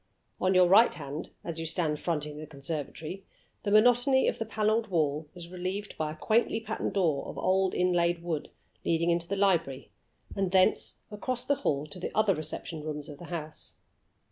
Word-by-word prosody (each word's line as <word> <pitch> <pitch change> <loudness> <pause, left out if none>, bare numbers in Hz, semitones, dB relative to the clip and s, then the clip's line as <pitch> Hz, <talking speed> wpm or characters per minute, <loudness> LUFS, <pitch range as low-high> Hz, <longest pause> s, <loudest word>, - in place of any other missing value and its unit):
On 185 0 +2
your 185 0 +7
right 205 +6 +7
hand, 145 0 -5
as 165 -1 -4
you 165 - -2
stand 155 -3 0
fronting 150 -3 -2
the 155 - -7
conservatory, 155 +5 -5 0.4
the 205 - -2
monotony 245 +5 +5
of - - 0
the 225 - -3
paneled 220 +1 +1
wall 155 -4 0
is 170 -1 -8
relieved 185 +3 -4
by 155 -1 -2
a - - -7
quaintly 225 +6 +2
patterned 225 - -3
door 165 -8 +1
of - - -7
old 190 0 +2
inlaid 175 -1 +2
wood, 160 -3 -3 0.3
leading 170 +1 +2
into 170 0 0
the 200 - -1
library, 170 -9 +1 0.4
and 195 -2 0
thence, 185 -1 +2
across 245 +4 -2
the 285 - +3
great - - -6
hall, 140 +1 0
to 155 +4 -6
the - - -3
other 215 -2 +4
reception 155 0 -5
rooms 150 -1 -5
of 145 - -9
the 175 - -9
house. 155 -3 -5
175 Hz, 190 wpm, -29 LUFS, 155-200 Hz, 0.4 s, your